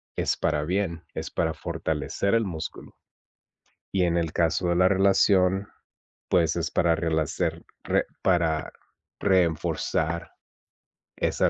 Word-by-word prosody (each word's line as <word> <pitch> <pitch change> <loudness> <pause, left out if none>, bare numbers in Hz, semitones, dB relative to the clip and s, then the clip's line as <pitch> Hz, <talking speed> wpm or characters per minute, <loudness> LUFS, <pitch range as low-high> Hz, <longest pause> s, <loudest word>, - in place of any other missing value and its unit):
es - - 0
para 75 - 0
bien, 90 0 -2
es - - -5
para 80 - -1
fortalecer 80 +4 -2
el 115 -1 +3
músculo. 80 -5 -6 1.0
Y 95 -2 +2
en 85 -1 +2
el 85 -2 -1
caso 85 +2 +1
de 85 - +2
la 90 +1 +5
relación, 95 0 +3 0.6
pues, 80 -3 +3
es - - -1
para 85 -1 +3
relacer 80 -2 -1 0.2
re - - +1 0.2
para 85 -4 +1 0.5
reforzar 85 -2 0 0.9
esa - - +1
85 Hz, 120 wpm, -26 LUFS, 80-95 Hz, 1.0 s, la